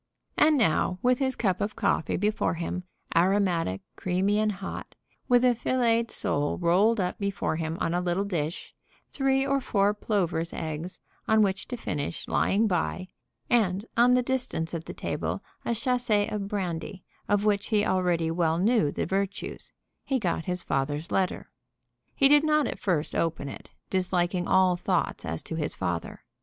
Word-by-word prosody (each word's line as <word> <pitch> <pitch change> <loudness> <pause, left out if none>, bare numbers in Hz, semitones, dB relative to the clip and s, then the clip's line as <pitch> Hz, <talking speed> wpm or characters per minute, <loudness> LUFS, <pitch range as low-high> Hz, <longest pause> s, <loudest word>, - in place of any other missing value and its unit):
And 305 -1 +5
now, 180 - +2
with 250 0 +3
his 265 -1 0
cup 190 -5 0
of 205 +1 -2
coffee 200 -6 0
before 210 -2 0
him, 175 +2 -4 0.3
aromatic, 175 - +2
creamy, 190 +3 +1
and 215 0 +2
hot, 195 0 -7 0.3
with 245 0 +5
a 250 - +5
filleted 235 -1 +1
sole 145 0 -1
rolled 195 +6 +3
up 180 -1 -1
before 200 -5 -1
him 160 0 -3
on 165 - 0
a 175 - +1
little 180 +2 0
dish, 170 -4 -3 0.4
three 270 -1 +1
or 275 0 +1
four 200 -3 +2
plover's 180 -6 -1
eggs, 160 +3 -5 0.3
on 220 -1 +5
which 195 -1 -1
to 245 - -4
finish, 150 -8 -4
lying 210 +3 +2
by, 185 -1 -1 0.4
and, 205 -4 +2
on 245 +2 +5
the 250 - +3
distance 245 -11 -2
of 165 -1 -4
the - - -7
table, - - -3 0.2
a 235 - -1
chasse 250 0 -1 0.2
of 205 -2 -3
brandy, 185 -1 -4 0.3
of 205 0 +2
which 205 -1 +1
he 210 -2 +2
already 175 -3 +1
well 165 -1 +1
knew 195 -5 +3
the - - -2
virtues, 195 +2 -3 0.3
he 270 - 0
got 175 -7 -1
his 180 0 -2
father's 145 +4 -2
letter. 185 -1 -1 0.6
He 275 - +5
did 295 +1 +6
not 305 -1 +3
at - - -4
first 170 -6 0
open 165 -4 -1
it, - - -10 0.2
disliking 180 -1 0
all 185 -1 +4
thoughts 180 - -1
as 80 0 -4
to 160 - -5
his 150 - -2
father. 90 -3 -3
190 Hz, 170 wpm, -27 LUFS, 170-225 Hz, 0.6 s, did